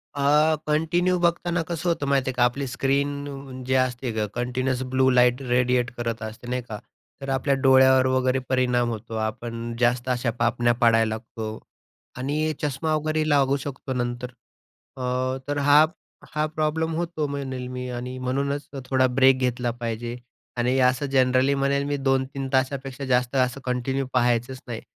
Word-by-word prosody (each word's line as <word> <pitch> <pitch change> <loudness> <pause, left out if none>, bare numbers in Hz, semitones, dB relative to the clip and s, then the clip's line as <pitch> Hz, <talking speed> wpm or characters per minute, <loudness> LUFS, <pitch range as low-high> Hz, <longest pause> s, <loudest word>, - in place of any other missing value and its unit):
अ, 150 +3 +3
continue 175 +4 +2
बघताना 170 0 +1
कसं 170 +1 -3
होतं 165 -4 0
माहिती 135 -1 +1
आहे - - -2
का 125 0 +2
आपली 135 +3 0
स्क्रीन 140 0 -2
जे 130 +1 0
असते 130 -1 0
गं 110 -1 -1
कंटीन्यूअस 125 +1 -1
ब्लू 130 0 +4
लाईट 125 0 +4
रेडिएट 125 0 +2
करत 115 -1 -3
असते 110 +2 -8
नाही 125 0 -1
का, 105 - -4 0.4
तर 135 - -5
आपल्या 135 +1 +1
डोळ्यावर 130 -1 +5
वगैरे 130 0 +1
परिणाम 125 -2 +2
होतो. 115 0 -6
आपण 115 +1 -4
जास्त 120 +1 +1
अशा 120 -1 0
पापण्या 120 0 +2
पाडायला 115 -1 +4
लागतो 110 0 -6 0.6
आणि 150 +4 -1
चष्मा 150 +2 -1
वगैरे 155 0 0
लागू 140 -1 +3
शकतो 135 -1 -5
नंतर. 120 0 -3 0.7
अ, 130 +1 -1
तर 145 0 -1
हा 150 +2 +7 0.5
हा 150 0 +2
प्रॉब्लेम 155 +1 -1
होतो 165 -2 -2
म्हणेल 135 -3 -4
मी 125 0 -5
आणि 125 +1 -5
म्हणूनच 140 +3 -2 0.2
थोडा 130 0 +2
ब्रेक 130 +1 +4
घेतला 125 -1 0
पाहिजे. 120 0 -4 0.4
आणि 125 +2 +1
असं 125 +2 +2
जनरली 130 0 +3
म्हणेल 140 0 +1
मी 145 - -1
2-3 135 0 -1
तासापेक्षा 135 +1 -1
जास्त 125 0 +1
असं 130 +1 +1
कंटिन्यू 130 +2 -1
पाहायचंच 125 +1 +1
नाही. 115 -2 -5
130 Hz, 155 wpm, -24 LUFS, 125-140 Hz, 0.7 s, हा